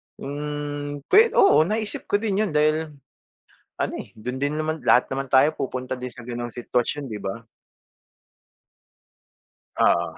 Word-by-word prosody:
Hmm, 145 Hz, 0 st, -5 dB
pwe 430 Hz, -, +9 dB, 0.2 s
oo, 395 Hz, -, +6 dB
naisip 215 Hz, +1 st, -2 dB
ko -, -, +2 dB
din 205 Hz, -2 st, -1 dB
yun 215 Hz, -, 0 dB
dahil, 155 Hz, +1 st, +2 dB, 0.9 s
ano -, -, -1 dB
eh, -, -, -9 dB
dun 125 Hz, +4 st, -5 dB
din 145 Hz, +2 st, -1 dB
naman 155 Hz, 0 st, -3 dB
lahat 125 Hz, -, +4 dB
naman 135 Hz, +1 st, -2 dB
tayo 135 Hz, +3 st, +6 dB
pupunta 130 Hz, 0 st, -3 dB
din 125 Hz, -1 st, -6 dB
sa 125 Hz, -, -10 dB
ganong 120 Hz, -1 st, -5 dB
sitwasyon, 125 Hz, +4 st, -1 dB
'di 110 Hz, -, -5 dB
ba? 115 Hz, +5 st, -4 dB, 2.3 s
Oo. -, -, +2 dB
145 Hz, 140 wpm, -24 LUFS, 125-155 Hz, 2.3 s, pwe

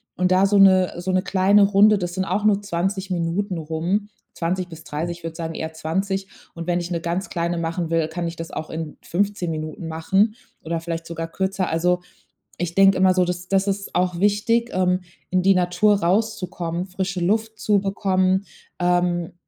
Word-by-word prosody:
Und 180 Hz, 0 st, +1 dB
da 185 Hz, +1 st, +5 dB
so 200 Hz, +1 st, +3 dB
'ne 185 Hz, -2 st, +6 dB
so 180 Hz, +2 st, -2 dB
'ne 185 Hz, 0 st, +2 dB
kleine 200 Hz, +1 st, +4 dB
Runde, 205 Hz, +1 st, +5 dB
das 175 Hz, -2 st, -3 dB
sind 190 Hz, +1 st, -1 dB
auch 195 Hz, +3 st, -1 dB
nur 205 Hz, -1 st, +3 dB
20 195 Hz, 0 st, -2 dB
Minuten 180 Hz, +2 st, -1 dB
rum, 165 Hz, +6 st, -2 dB, 0.3 s
20 180 Hz, +2 st, -2 dB
bis 160 Hz, -1 st, -11 dB
30, 170 Hz, +3 st, -4 dB
würde 165 Hz, -1 st, -5 dB
sagen, 165 Hz, -1 st, -5 dB
eher 160 Hz, 0 st, -4 dB
20. 190 Hz, +5 st, -2 dB, 0.3 s
Und 165 Hz, 0 st, -6 dB
wenn 175 Hz, 0 st, +1 dB
ich 175 Hz, 0 st, -5 dB
'ne 170 Hz, -1 st, -1 dB
ganz 170 Hz, +3 st, -2 dB
kleine 170 Hz, 0 st, -1 dB
machen 165 Hz, 0 st, -2 dB
will, 165 Hz, -1 st, +1 dB
kann 170 Hz, +1 st, -3 dB
ich 165 Hz, -, -5 dB
das 165 Hz, 0 st, -6 dB
auch 155 Hz, -, -5 dB
in 160 Hz, -1 st, -6 dB
15 200 Hz, -1 st, -1 dB
Minuten 155 Hz, +1 st, -5 dB
machen 190 Hz, +7 st, +1 dB, 0.3 s
oder 165 Hz, +1 st, -2 dB
vielleicht 165 Hz, -1 st, -4 dB
sogar 165 Hz, 0 st, -4 dB
kürzer. 190 Hz, +1 st, -1 dB
Also, 180 Hz, +2 st, +1 dB, 0.6 s
ich 170 Hz, 0 st, -3 dB
denke 195 Hz, 0 st, +6 dB
immer 185 Hz, 0 st, +5 dB
so, 180 Hz, -1 st, +3 dB
das 180 Hz, 0 st, -4 dB
das 195 Hz, +1 st, +1 dB
ist 200 Hz, 0 st, -3 dB
auch 180 Hz, -1 st, +1 dB
wichtig, 210 Hz, +4 st, +2 dB
ähm, 185 Hz, 0 st, +1 dB, 0.3 s
in 185 Hz, -, +3 dB
die 195 Hz, 0 st, +5 dB
Natur 180 Hz, +4 st, +3 dB
rauszukommen, 180 Hz, -3 st, -1 dB
frische 190 Hz, 0 st, -3 dB
Luft 220 Hz, +4 st, 0 dB
zu 205 Hz, -1 st, +3 dB
bekommen, 190 Hz, -1 st, +1 dB, 0.3 s
ähm, 175 Hz, -1 st, +1 dB
180 Hz, 190 wpm, -22 LUFS, 170-195 Hz, 0.6 s, ne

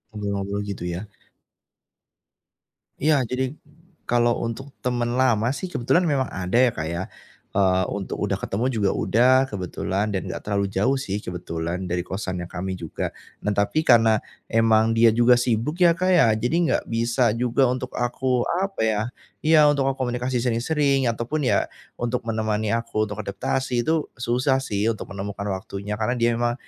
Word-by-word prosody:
Ngobrol-ngobrol 100 Hz, -1 st, -2 dB
gitu 100 Hz, -3 st, -5 dB
ya? 85 Hz, -, -4 dB, 2.0 s
Iya 150 Hz, -2 st, +3 dB
jadi 130 Hz, +1 st, -1 dB, 0.6 s
kalau 120 Hz, 0 st, +2 dB
untuk 130 Hz, +4 st, -5 dB
teman 120 Hz, -1 st, -1 dB
lama 120 Hz, -4 st, +2 dB
sih 185 Hz, -, -5 dB
kebetulan 170 Hz, +3 st, +2 dB
memang 140 Hz, -4 st, +1 dB
ada 95 Hz, +4 st, -1 dB
ya, 125 Hz, -1 st, +5 dB
Kak, 80 Hz, 0 st, -4 dB
ya. 85 Hz, +2 st, -2 dB, 0.5 s
Eee, 95 Hz, -1 st, +2 dB
untuk 100 Hz, -2 st, -4 dB
udah -, -, 0 dB
ketemu 110 Hz, +6 st, -2 dB
juga 110 Hz, -6 st, +1 dB
udah 125 Hz, +3 st, +3 dB, 0.2 s
kebetulan 100 Hz, +1 st, -2 dB
dan 95 Hz, -, -3 dB
enggak -, -, -5 dB
terlalu 100 Hz, -1 st, 0 dB
jauh 130 Hz, +7 st, +1 dB
sih 100 Hz, -6 st, -3 dB
kebetulan 85 Hz, +1 st, -4 dB
dari 90 Hz, 0 st, 0 dB
kosannya 95 Hz, -2 st, -4 dB
kami 95 Hz, +1 st, -4 dB
juga. 85 Hz, -3 st, -4 dB, 0.3 s
Nah 105 Hz, -, -1 dB
tapi 100 Hz, +10 st, +2 dB
karena 115 Hz, -3 st, +5 dB, 0.3 s
emang 115 Hz, 0 st, +3 dB
dia 115 Hz, 0 st, +7 dB
juga 120 Hz, +2 st, +5 dB
sibuk 120 Hz, +6 st, 0 dB
ya, 170 Hz, -1 st, +7 dB
Kak, 185 Hz, +2 st, 0 dB
ya, 175 Hz, -9 st, +6 dB
jadi 120 Hz, +8 st, -1 dB
enggak 170 Hz, -2 st, +1 dB
bisa 115 Hz, 0 st, +1 dB
juga 125 Hz, +1 st, +2 dB
untuk 125 Hz, 0 st, -3 dB
aku, 125 Hz, 0 st, 0 dB, 0.2 s
apa 195 Hz, -, -2 dB
ya 110 Hz, -1 st, +1 dB, 0.4 s
iya 155 Hz, -1 st, +6 dB
untuk 140 Hz, -2 st, +1 dB
berkomunikasi 125 Hz, -1 st, -2 dB
sering-sering, 135 Hz, +3 st, +1 dB
ataupun 125 Hz, +6 st, -2 dB
ya -, -, +2 dB, 0.3 s
untuk 120 Hz, +1 st, -1 dB
menemani 110 Hz, -1 st, -1 dB
aku 115 Hz, -2 st, -1 dB
untuk 105 Hz, 0 st, -5 dB
adaptasi 125 Hz, +5 st, -1 dB
itu 160 Hz, -1 st, +1 dB
susah 125 Hz, +3 st, +1 dB
sih 105 Hz, -4 st, 0 dB
untuk 110 Hz, -, -7 dB
menemukan 100 Hz, +1 st, -5 dB
waktunya 100 Hz, +1 st, -4 dB
karena 110 Hz, +3 st, 0 dB
dia 120 Hz, 0 st, +2 dB
emang 120 Hz, 0 st, +1 dB
115 Hz, 160 wpm, -24 LUFS, 100-130 Hz, 2.0 s, dia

